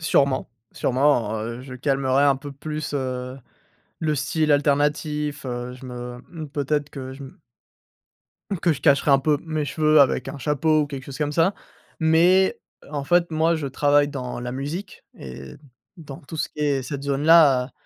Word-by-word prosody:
sûrement, 140 -4 +1 0.2
sûrement, 125 -4 +1
heu, 115 +3 -5
je 130 -1 -9
calmerais 135 +1 +1
un 140 -1 +4
peu 145 +2 -8
plus 150 +1 -5
heu, 130 -1 -3 0.6
le 155 -2 0
style 150 +2 0
alternatif, 145 0 0
heu, 125 0 -4
je 130 +1 -11
me 125 0 -7
mmh 155 -4 -7
peut-être 145 +1 -1
que 130 -2 -7
je 140 - -10
me 135 - -12 1.2
que 175 - +3
je 140 - -9
cacherais 140 -1 +3
un 135 - +7
peu 150 +2 +2
mes 155 -2 -2
cheveux 155 +2 +3
avec 130 -2 +1
un - - -6
chapeau 150 +3 +1
ou 145 - -1
quelque 135 -2 -7
chose 140 - -8
comme 150 -1 -1
ça, 170 +5 +2 0.4
mais, 175 +4 +4 0.2
heu, - - -16
en 145 -2 -3
fait 175 +3 +2
moi, 160 +2 +2
je 155 -3 -4
travaille 145 +2 +3
dans 130 -4 -5
la 125 0 -5
musique 145 +9 -6
et 65 0 -9 0.4
dans 145 -5 -9
tout 155 +3 -9
ce - - -2
qui - - -13
est 140 -3 +1
cette 140 +1 -5
zone-là, 140 -2 +4
145 Hz, 180 wpm, -23 LUFS, 130-155 Hz, 1.2 s, un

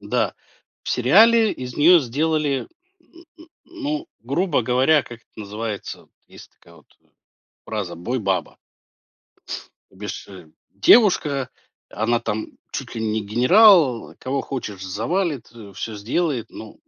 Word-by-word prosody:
Да. 110 0 -1 0.5
В - - -8
сериале 220 - +5
из 125 -1 -8
нее 170 +4 +6
сделали, 145 +1 -1 0.3
м, 340 0 -20
м, 325 - -15 0.2
ну, 315 -1 -5
грубо 140 +2 0
говоря, 130 +5 +3
как 120 -1 -11
это - - -40
называется, 105 +1 -6 0.2
есть - - -15
такая 85 0 -21
вот, 75 - -23
э, - - -35 0.6
фраза: 100 -6 -4
бой-баба. 95 -2 -2 1.3
Без 100 +1 -7
ше 90 -5 -11 0.2
девушка, 150 - +4 0.4
она 115 +2 0
там 110 -2 -3 0.2
чуть - - -6
ли 110 - -3
не 110 0 -1
генерал, 135 - +5
кого 135 +1 -2
хочешь 105 -8 -6
завалит, 140 - -2
а, 105 -4 -12
всё 110 -2 -6
сделает, 125 +4 -2
ну 110 -1 -10
125 Hz, 130 wpm, -22 LUFS, 105-160 Hz, 1.3 s, нее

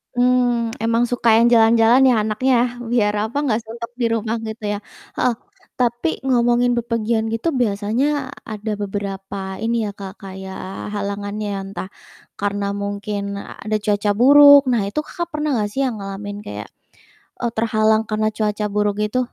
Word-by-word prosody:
Mmm, 245 -2 +2
emang 230 +1 +2
suka 230 -2 +3
yang 235 - +5
jalan-jalan 230 +2 +5
ya 250 -4 +5
anaknya, 250 +5 +1 0.4
biar 210 -4 +2 0.2
apa, 280 - -4
gak 220 -2 +1
suntuk 230 +1 -8
di 245 -1 -1
rumah 225 0 -1
gitu 220 0 -7
ya, - - -2 0.4
heeh. 250 -2 +1 0.5
Tapi 240 -7 +1 0.2
ngomongin 240 -1 +3
bepergian 230 -1 0
gitu 230 +9 0
biasanya 245 +7 0 0.2
ada 215 0 -5
beberapa 195 -1 -5
ini 230 +1 0
ya - - -4
Kak, 195 -1 -7
kayak 190 0 -7
halangannya 205 +1 -3
ya, - - -3
entah 195 -1 -7 0.5
karena 200 0 -2 0.2
mungkin 205 0 -3 0.2
ada 215 +1 -5
cuaca 205 0 0
buruk. 285 +2 +9
Nah 235 -3 +2
itu 200 +9 -2
Kakak 345 +2 -5
pernah 300 0 -1
enggak 210 -1 -1
sih 275 - -1
yang 250 -3 -2
ngalamin 200 +1 -6
kayak, 105 0 -6 0.8
eee, 235 - 0
terhalang 220 -1 +2
karena 215 0 0
cuaca 210 -1 -1
buruk 210 0 +1
itu? 210 +4 -1
220 Hz, 155 wpm, -20 LUFS, 205-240 Hz, 0.8 s, buruk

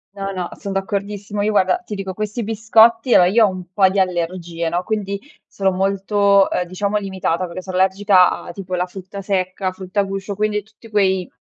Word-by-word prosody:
No, 195 0 -4
no. 180 -2 -4
Son 200 - -6
d'accordissimo. 200 +1 -3
Io, 215 - +1
guarda, 190 -3 +3
ti 210 - -7
dico 195 -1 -4
questi 215 +3 -3
biscotti 225 +2 +4
a - - +7
o - - +6
io 220 +5 +5
ho 205 - +2
un 185 -1 -7
po' 190 0 +4
di 195 +1 0
allergie, 175 -2 -2
no, 175 +2 0
quindi 200 -1 -2 0.3
sono 195 -1 -1
molto, 195 +1 +2
uhm, 180 - 0
diciamo, 200 +4 -2
limitata 190 -3 -2
perché 180 +1 -7
so 185 - -14
allergica 190 0 +4
a - - -8
tipo 185 0 -8
la 180 0 0
frutta 190 +2 -9
secca, 185 -1 -1
frutta 185 +2 -4
a - - +4
guscio, 195 +1 -4
quindi, 210 0 -1
tutti 220 +2 -18
quei 190 -4 +1
195 Hz, 205 wpm, -20 LUFS, 185-205 Hz, 0.3 s, a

